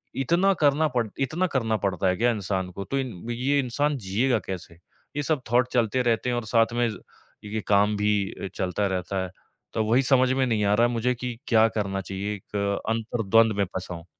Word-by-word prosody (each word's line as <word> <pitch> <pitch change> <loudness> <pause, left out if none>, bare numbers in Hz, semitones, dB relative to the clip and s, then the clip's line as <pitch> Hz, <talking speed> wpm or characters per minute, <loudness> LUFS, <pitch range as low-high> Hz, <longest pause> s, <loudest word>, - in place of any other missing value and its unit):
इतना 170 +9 +2
करना 150 +2 +4
पड़ 120 -2 +1
इतना 160 +8 0
करना 115 -8 0
पड़ता 95 -3 -1
है 90 - +2
क्या 120 +1 +3
इंसान 95 -4 -2
को, 100 +2 -6
तो 135 +7 -1
इन 120 -9 -5
ये 130 +4 +1
इंसान 140 +3 0
जिएगा 115 +4 +1
कैसे? 90 -3 -6 0.4
ये 145 - 0
सब 150 -1 0
थॉट 125 +1 +4
चलते 120 0 +2
रहते 120 +1 +1
हैं, 120 - 0
और 120 - -3
साथ 115 +1 +2
में 120 0 +1
ज़ 110 - -6 0.5
ये 110 +1 -3
काम 105 +1 +3
भी 105 0 +2 0.2
अ, - - -6
चलता 95 +2 -1
रहता 95 0 -2
है। 95 - -5 0.4
तो 110 - +1
वही 115 +5 +3
समझ 130 -1 +3
में 130 0 +2
नहीं 110 -4 0
आ 100 - +3
रहा 120 +2 +4
है - - -3
मुझे 120 +2 +1
कि 125 -1 -5
क्या 110 -1 +5
करना 100 -3 -2
चाहिए, 95 +3 -4
एक 100 0 -3
अंतरद्वंद 115 -1 +2
में 100 - +3
फँसा 90 0 -6
हूँ। 85 -1 -10
115 Hz, 215 wpm, -25 LUFS, 100-125 Hz, 0.5 s, क्या